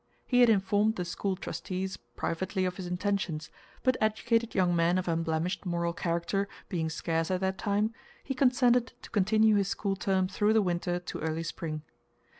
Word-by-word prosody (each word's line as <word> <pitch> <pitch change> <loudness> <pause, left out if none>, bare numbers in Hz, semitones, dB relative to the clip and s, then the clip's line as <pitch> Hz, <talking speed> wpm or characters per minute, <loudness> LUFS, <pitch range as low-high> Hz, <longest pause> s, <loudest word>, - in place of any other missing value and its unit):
He 250 - +2
had 245 -1 +7
informed 205 +1 +3
the 180 - -3
school 190 +3 -2
trustees 190 0 -4 0.2
privately 185 +2 -1
of 180 -1 -2
his 185 - -5
intentions, 180 -4 -2 0.3
but 255 -1 +3
educated 230 +2 +1
young 180 -2 +3
men 170 +2 +3
of 185 - -2
unblemished 165 +2 -1
moral 170 -2 -1
character 170 +4 -1 0.2
being 165 -3 -1
scarce 165 0 -1
at 185 0 0
that 190 0 -1
time, 210 +2 +1 0.3
he 270 - -2
consented 250 -2 +3
to - - -11
continue 215 +1 +4
his 200 -2 +1
school 195 0 -1
term 190 -1 +1
through 205 +3 +2
the 220 -1 +4
winter 175 -1 0
to 175 - -6
early 160 +1 -2
spring. 155 -2 -4
190 Hz, 175 wpm, -30 LUFS, 170-210 Hz, 0.3 s, had